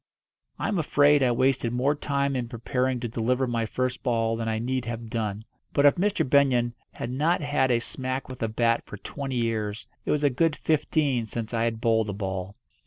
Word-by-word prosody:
I - - -2
am 200 -4 0
afraid 145 -1 +4
I 130 - +4
wasted 125 -1 +1
more 130 +4 +2
time 140 -2 -1
in 125 -2 -2
preparing 125 +2 -1
to 120 - -2
deliver 125 +3 0
my 115 -2 -1
first 130 +2 -2
ball 115 -2 +1
than 115 0 -2
I 110 - 0
need 130 +2 -2
have 115 -1 -5
done; 110 -2 -3 0.3
but 140 - +3
if 145 - +8
Mr. 200 -4 0
Benyon 125 -4 +3 0.2
had 120 - -5
not 155 +7 +1
had 145 -3 +1
a 120 - +4
smack 130 +2 -4
with 130 -1 -9
a 115 - +1
bat 115 +1 +1
for 105 - -8
twenty 135 +5 -5
years 110 -2 -1 0.2
it - - -6
was 150 0 +1
a 145 - +4
good 155 +4 +2
fifteen 145 -6 +1
since 115 +1 -5
I 115 0 +1
had 115 -1 -1
bowled 110 -2 +2
a - - -2
ball. 95 -1 -4
125 Hz, 210 wpm, -26 LUFS, 115-140 Hz, 0.3 s, if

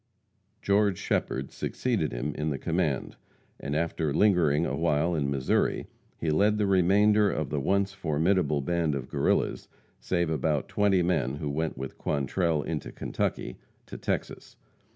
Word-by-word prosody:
George 100 -1 +2
Shepherd 65 +1 -2
succeeded 110 - -1
him 65 +5 -3
in 75 +1 -2
the 70 - -2
command, - - -1 0.4
and 70 +1 -3
after 80 -1 -1
lingering 85 -4 +3
awhile 85 0 +1
in 70 -4 0
Missouri, 70 -2 0 0.3
he 80 - -1
led 105 +7 +3
the 105 - +1
remainder 100 +3 +4
of 80 -6 -3
the 75 - 0
once 100 +6 +1
formidable 80 -3 +1
band 80 0 0
of 65 -1 -5
Guerrillas, - - 0 0.3
save 85 -3 0
about 75 -2 0
twenty 100 -3 +2
men, 75 -7 0
who 75 -1 -3
went 80 0 -2
with 65 +1 -7
Quantrell 75 +2 0
into 80 -4 -4
Kentucky - - -3 0.3
to - - -9
Texas. - - -4
80 Hz, 145 wpm, -28 LUFS, 75-95 Hz, 0.4 s, remainder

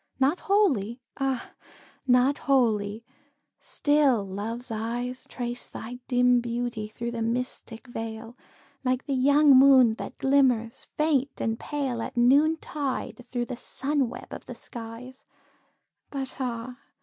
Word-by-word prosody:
Not 275 +6 +2
wholly 270 - +1 0.2
ah! 270 -2 -2 0.6
not 255 +3 +4
wholly 225 -5 +1 0.6
still 285 -8 +2
Love's 225 +6 -5
eyes 240 +3 -4
Trace 245 -1 -4
thy 245 +2 -8
dim 250 -1 +4
beauty 235 -2 -3
through 235 +2 -5
the 235 -1 -4
mystic 235 0 -3
veil, 225 -1 -7 0.5
Like 255 0 0
the 280 - -2
young 285 +3 +5
moon 260 -3 +7
that - - -7
glimmers 255 -5 +2
faint 290 -3 +1
and 225 0 -1
pale, 270 -5 -3
At 255 +2 -6
noontide 275 -1 +1
through 245 -1 -2
the 250 - -5
sun 275 0 0
web - - -9
of - - -8
the - - -7
skies; 240 +2 -9 0.8
But 270 -2 -5
ah! 245 -1 -4
250 Hz, 125 wpm, -27 LUFS, 230-270 Hz, 0.8 s, moon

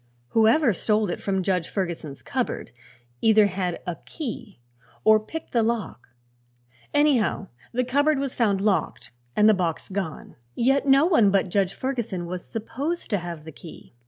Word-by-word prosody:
Whoever 225 +3 +4
stole 210 +1 +1
it - - -5
from 190 -2 -1
Judge 180 -3 0
Ferguson's 170 -7 -4
cupboard 255 - -3 0.5
either 215 -1 +5
had 185 -3 -2
a 175 -2 -4
key 230 - -7 0.4
or 215 0 +6
picked 320 +9 -8
the 235 - +2
lock; 225 - -2 0.8
anyhow 275 -9 +2 0.2
the 250 +1 0
cupboard 285 +4 +2
was 275 -1 -2
found 205 -5 +1
locked 205 -2 -1 0.2
and 210 - +5
the 220 - +7
box 175 -5 -2
gone. 190 -6 -5 0.2
Yet 270 +4 +2
no 275 +3 +6
one 275 - +4
but 195 -1 +1
Judge 195 0 0
Ferguson 235 -9 -3
was 180 +1 -5
supposed 270 +9 -4
to 205 - +2
have 170 -3 -7
the 160 - -8
key. 160 -2 -13
215 Hz, 160 wpm, -25 LUFS, 185-255 Hz, 0.8 s, the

